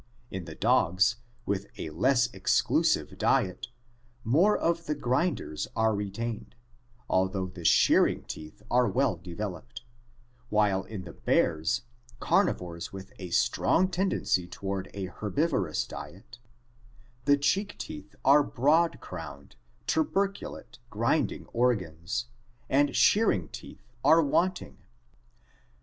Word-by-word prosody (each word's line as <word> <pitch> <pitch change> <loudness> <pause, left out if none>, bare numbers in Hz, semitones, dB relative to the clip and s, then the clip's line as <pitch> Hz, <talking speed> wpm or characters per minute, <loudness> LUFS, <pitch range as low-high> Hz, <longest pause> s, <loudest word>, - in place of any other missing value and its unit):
In 95 -2 -5
the 80 -1 -9
dogs, 105 -3 +3 0.3
with 100 0 -2
a 80 - -5
less 120 - +3
exclusive - - +1
diet, - - +1 0.6
more 165 - +4
of 170 0 -1
the 150 - 0
grinders 130 - -1
are 110 -1 +2
retained, 105 +3 -4 0.5
although 95 0 +1
the 90 -1 -9
shear - - +5
ing - - -4
teeth 75 0 -9
are 125 0 +4
well 130 -5 +1
developed, 90 - -7 0.7
while 100 -3 +2
in 105 -4 -7
the 85 - -10
bears, 85 +10 +1 0.4
carnivores 85 -1 0
with 95 0 -10
a 90 -2 -6
strong 120 - +2
tendency 180 - 0
toward 95 +1 -4
an 100 -2 -3
herbivorous 105 - 0
diet - - -10
(omnivorous), 120 +1 -31
the 145 0 +5
cheek 190 +9 0
teeth 305 -1 -8
are 140 +3 +7
broad 150 +6 +2
crowned, - - -9 0.3
tuberculate 195 - -2
grinding 115 +9 0
organs, 105 -3 0 0.5
and 140 +1 +3
shearing 200 - +3
teeth 105 +5 -12
are 165 +1 +6
wanting. 180 +6 0
115 Hz, 115 wpm, -28 LUFS, 95-140 Hz, 0.7 s, are